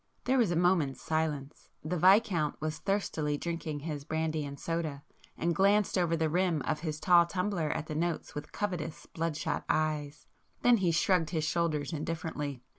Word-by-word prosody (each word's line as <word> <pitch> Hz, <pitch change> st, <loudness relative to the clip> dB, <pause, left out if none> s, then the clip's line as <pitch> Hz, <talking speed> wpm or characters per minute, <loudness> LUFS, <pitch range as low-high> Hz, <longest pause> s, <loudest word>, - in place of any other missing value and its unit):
There 260 Hz, +1 st, +2 dB
was 230 Hz, -6 st, +3 dB
a 175 Hz, -, 0 dB
moment's 170 Hz, -6 st, +2 dB
silence. 155 Hz, -3 st, -3 dB, 0.2 s
The 170 Hz, +3 st, -1 dB
Viscount 185 Hz, -3 st, +4 dB
was 155 Hz, 0 st, -3 dB
thirstily 160 Hz, -7 st, -1 dB
drinking 165 Hz, -3 st, -4 dB
his 150 Hz, -2 st, -4 dB
brandy 160 Hz, 0 st, -1 dB
and 140 Hz, 0 st, -7 dB
soda, 160 Hz, -4 st, -3 dB, 0.3 s
and 170 Hz, +2 st, +1 dB
glanced 200 Hz, +1 st, +3 dB
over 170 Hz, -3 st, +2 dB
the 160 Hz, 0 st, +1 dB
rim 170 Hz, -2 st, +1 dB
of 155 Hz, -, -1 dB
his 155 Hz, -2 st, -4 dB
tall 175 Hz, -1 st, +5 dB
tumbler 180 Hz, -3 st, -1 dB
at 150 Hz, -, -2 dB
the 155 Hz, -, -5 dB
notes 165 Hz, +1 st, -2 dB
with 150 Hz, +1 st, -7 dB
covetous 175 Hz, -6 st, -3 dB
bloodshot 165 Hz, -2 st, -2 dB
eyes,—then 155 Hz, +9 st, 0 dB
he 185 Hz, -4 st, +1 dB
shrugged 165 Hz, 0 st, +2 dB
his 160 Hz, -3 st, -1 dB
shoulders 155 Hz, -2 st, 0 dB
indifferently. 150 Hz, -4 st, -4 dB
160 Hz, 165 wpm, -31 LUFS, 150-175 Hz, 0.3 s, tall